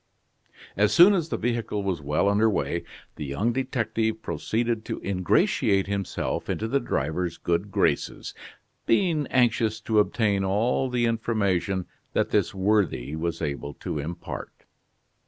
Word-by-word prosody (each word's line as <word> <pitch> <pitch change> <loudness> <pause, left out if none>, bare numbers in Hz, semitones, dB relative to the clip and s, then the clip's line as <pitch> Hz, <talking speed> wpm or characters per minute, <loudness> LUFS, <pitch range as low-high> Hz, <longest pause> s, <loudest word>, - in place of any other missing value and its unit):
As 105 +2 +3
soon 180 +4 +8
as 170 -4 0
the - - -1
vehicle 115 -3 -2
was 95 -5 -2
well 75 +7 +1
under 105 +2 +4
way, 105 - -1 0.3
the 75 - -4
young 100 - 0
detective 110 -4 -1
proceeded 115 0 -1
to - - -4
ingratiate 100 - +2
himself 100 -1 -3
into 110 - -1
the 140 +5 +1
driver's 80 - -2
good 85 +4 -1
graces, - - 0 0.5
being 155 +1 +2
anxious 115 -3 +2
to 110 -1 +2
obtain 105 -2 +1
all 115 +7 +1
the 120 -1 +1
information 100 -5 0 0.3
that - - +1
this 105 +1 +2
worthy 95 - +1
was 85 +1 -3
able 70 -1 -4
to 75 - -4
impart. 80 +4 -7
105 Hz, 135 wpm, -26 LUFS, 90-115 Hz, 0.5 s, soon